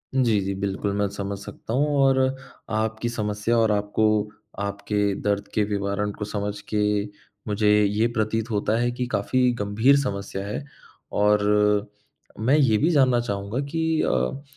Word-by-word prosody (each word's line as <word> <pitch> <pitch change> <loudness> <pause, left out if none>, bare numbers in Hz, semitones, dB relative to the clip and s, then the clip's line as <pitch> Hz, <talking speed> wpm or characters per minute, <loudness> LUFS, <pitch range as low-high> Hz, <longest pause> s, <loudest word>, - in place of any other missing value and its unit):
जी, 120 -5 +3
जी। 95 +1 -2
बिल्कुल, 100 +1 -2
मैं 100 0 +1
समझ 100 0 -4
सकता 105 +3 -8
हूँ 145 +3 +2
और 135 -1 +4 0.6
आपकी 110 +2 -2
समस्या 105 0 -1
और 110 -1 +3
आपको 105 +1 0 0.6
आपके 100 0 -1
दर्द 100 -1 -1
के 105 - +2
विवरण 100 0 -1
को 105 - -3
समझ 105 0 -4
के 105 - +2 0.6
मुझे 105 0 +1
ये 105 +3 +2
प्रतीत 110 +2 0
होता 105 +1 +1
है 120 0 +1
कि 125 +1 -3
काफ़ी 125 +5 +2
गंभीर 110 +7 +3
समस्या 100 -5 -4
है। 105 +7 -4 0.5
और 105 0 +3 1.0
मैं 125 +7 +3
ये 125 -8 +4
भी 155 +9 +2
जानना 130 -5 +4
चाहूँगा 100 +1 -3
कि 160 0 +1
अ, 65 - -1
105 Hz, 150 wpm, -24 LUFS, 100-120 Hz, 1.0 s, और